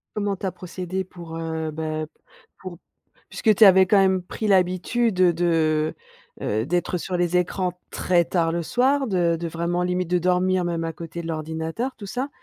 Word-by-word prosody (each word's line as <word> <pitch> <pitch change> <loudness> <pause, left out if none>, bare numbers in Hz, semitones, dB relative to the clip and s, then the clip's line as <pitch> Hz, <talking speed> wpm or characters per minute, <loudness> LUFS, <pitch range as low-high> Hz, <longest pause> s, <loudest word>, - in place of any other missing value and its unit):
Comment 205 -2 -1
tu 190 - -7
as 190 - 0
procédé 185 +1 -5
pour, 170 -3 -9
heu, 160 -1 -3
beh 155 0 -3 0.5
pour 185 -2 -9 0.5
puisque 215 -2 +2
tu 215 - +7
avais 190 -1 +7
quand 200 +2 +4
même 190 -1 +3
pris 215 +4 -5
l'habitude, 185 +3 +1
heu, 180 -1 +5
de 160 -2 +1 0.5
heu, 110 +3 -1
d'être 175 +2 -1
sur 180 +2 -3
les 175 0 +1
écrans 180 0 -1
très 175 -2 +2
tard 165 -1 0
le 170 0 -1
soir, 265 - +1
de 175 -5 +1
de 170 - -3
vraiment 170 +2 -1
limite 180 0 -1
de 180 - +3
dormir 180 +1 +1
même 170 -1 -2
à 165 - -3
côté 165 +1 -7
de - - -8
l'ordinateur, 160 - -4
tout 205 - -9
ça, 250 +8 -3
180 Hz, 190 wpm, -23 LUFS, 165-190 Hz, 0.5 s, tu